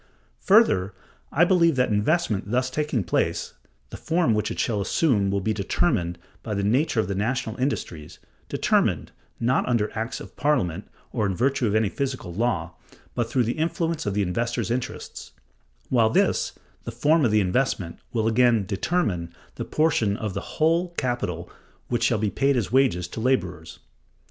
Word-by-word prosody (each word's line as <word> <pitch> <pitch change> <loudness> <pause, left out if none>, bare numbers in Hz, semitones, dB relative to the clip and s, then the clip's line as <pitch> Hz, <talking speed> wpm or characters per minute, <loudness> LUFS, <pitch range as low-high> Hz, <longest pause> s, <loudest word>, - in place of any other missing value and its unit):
Further, 105 - +4 0.4
I 170 +4 +4
believe 170 -4 +4
that, 125 -1 +2
investment 105 - +1
thus 130 +3 0
taking 145 -6 -1
place, - - -1 0.4
the - - -7
form 165 -7 +1
which 105 0 0
it 115 - -5
shall 105 -4 0
assume 105 -3 +2
will 100 0 0
be 110 +3 0
'determined' 100 - 0 0.2
by 110 -2 -4
the 100 - -1
nature 120 +4 +2
of 110 - +1
the 100 - -2
national 110 +3 -1
industries—'determined,' 90 - -2 0.3
not 125 +2 +1
under 110 -4 0
acts 115 +2 -3
of - - -11
Parliament, 105 - 0 0.2
or 110 -4 0
in 95 - -2
virtue 130 +2 +1
of 105 - 0
any 110 -1 +3
physical 130 -5 -4
law, 90 -5 -1 0.4
but 120 -2 -1
through 125 +1 +2
the 120 +6 -2
influence 165 -3 -1
of 100 - -1
the 105 - +2
investor's 115 +3 -2
interests; 125 0 -5 0.6
while 115 -3 +4
this, - - +1 0.3
the 115 - -5
form 150 +7 +2
of 120 - +4
the 105 0 +3
investment, 95 -3 -1
will 110 -2 0
again 115 -2 +3
'determine' 95 - -1 0.2
the - - -5
proportion 120 -10 +1
of 105 -3 -4
the - - -3 0.2
whole 170 +3 +2
capital 120 -10 -2 0.4
which 120 -1 0
shall 120 -1 +2
be 105 -1 -1
paid 140 0 +2
as 110 -4 -1
wages 125 -10 +2
to 90 - -7
laborers." 90 -9 -1
115 Hz, 170 wpm, -25 LUFS, 100-135 Hz, 0.6 s, Further